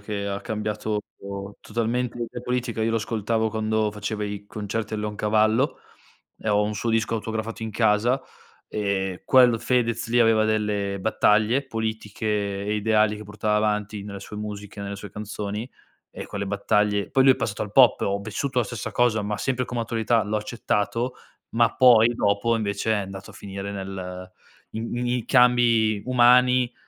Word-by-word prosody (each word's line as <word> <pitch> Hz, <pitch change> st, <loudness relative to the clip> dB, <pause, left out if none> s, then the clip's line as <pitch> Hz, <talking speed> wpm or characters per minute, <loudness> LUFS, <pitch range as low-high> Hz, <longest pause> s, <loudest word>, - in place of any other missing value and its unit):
che 100 Hz, -1 st, -4 dB
ha 100 Hz, 0 st, -3 dB
cambiato 105 Hz, -1 st, -3 dB, 0.6 s
totalmente 120 Hz, +2 st, -2 dB
l'idea 120 Hz, 0 st, -5 dB
politica, 125 Hz, -2 st, -2 dB
io 115 Hz, -, +1 dB
lo 115 Hz, -, +1 dB
ascoltavo 110 Hz, 0 st, -1 dB
quando 110 Hz, 0 st, 0 dB
faceva 105 Hz, 0 st, -3 dB
i 100 Hz, 0 st, -5 dB
concerti 105 Hz, +1 st, -4 dB
al 105 Hz, -, -2 dB
Leon 105 Hz, 0 st, -3 dB
Cavallo, 110 Hz, +5 st, +2 dB, 0.6 s
e -, -, -5 dB
ho 105 Hz, 0 st, +3 dB
un 105 Hz, +1 st, -2 dB
suo 115 Hz, +2 st, -2 dB
disco 115 Hz, 0 st, +1 dB
autografato 110 Hz, 0 st, -4 dB
in 110 Hz, -, -3 dB
casa, 110 Hz, +4 st, +2 dB, 0.5 s
e 95 Hz, -3 st, -2 dB
quel 125 Hz, -3 st, +5 dB
Fedez 115 Hz, -2 st, 0 dB
lì 120 Hz, +1 st, +2 dB
aveva 115 Hz, -2 st, +4 dB
delle 105 Hz, -2 st, 0 dB
battaglie 110 Hz, +5 st, +2 dB
politiche 110 Hz, -3 st, -4 dB, 0.4 s
e 105 Hz, +1 st, -1 dB
ideali 105 Hz, 0 st, +2 dB
che 105 Hz, -, -8 dB
portava 105 Hz, 0 st, -2 dB
avanti 105 Hz, -1 st, -1 dB
nelle 100 Hz, -1 st, -7 dB
sue 105 Hz, +2 st, -9 dB
musiche, 105 Hz, 0 st, -7 dB
nelle 100 Hz, 0 st, -5 dB
sue 100 Hz, 0 st, -9 dB
canzoni, 105 Hz, +2 st, -5 dB, 0.4 s
ecco -, -, -7 dB
le 100 Hz, -, -2 dB
battaglie 100 Hz, +1 st, +1 dB
poi 135 Hz, -, +4 dB
lui 135 Hz, 0 st, +7 dB
è -, -, -6 dB
passato 105 Hz, -2 st, -3 dB
al 105 Hz, -, -5 dB
pop, 125 Hz, -2 st, +6 dB
ho 100 Hz, 0 st, 0 dB
vissuto 120 Hz, +6 st, -3 dB
la 120 Hz, -, +2 dB
stessa 110 Hz, 0 st, -5 dB
cosa, 120 Hz, -3 st, +2 dB
ma 105 Hz, +1 st, -2 dB
sempre 130 Hz, +2 st, -1 dB
come 120 Hz, -1 st, -3 dB
attualità 115 Hz, 0 st, +1 dB
l'ho 105 Hz, +1 st, -1 dB
accettato, 110 Hz, +2 st, -2 dB, 0.4 s
ma 115 Hz, 0 st, +3 dB
poi 120 Hz, -3 st, +7 dB
dopo 100 Hz, +2 st, +1 dB
invece 105 Hz, 0 st, -2 dB
è -, -, +3 dB
andato 95 Hz, -1 st, -6 dB
a -, -, -15 dB
finire 100 Hz, 0 st, -6 dB
nel 95 Hz, -2 st, -6 dB, 0.4 s
i 110 Hz, -, -5 dB
m 115 Hz, +1 st, -4 dB
i 120 Hz, +1 st, +1 dB
i 115 Hz, -, -6 dB
cambi 115 Hz, -4 st, +4 dB
umani, 125 Hz, 0 st, +5 dB
110 Hz, 175 wpm, -24 LUFS, 105-115 Hz, 0.6 s, lui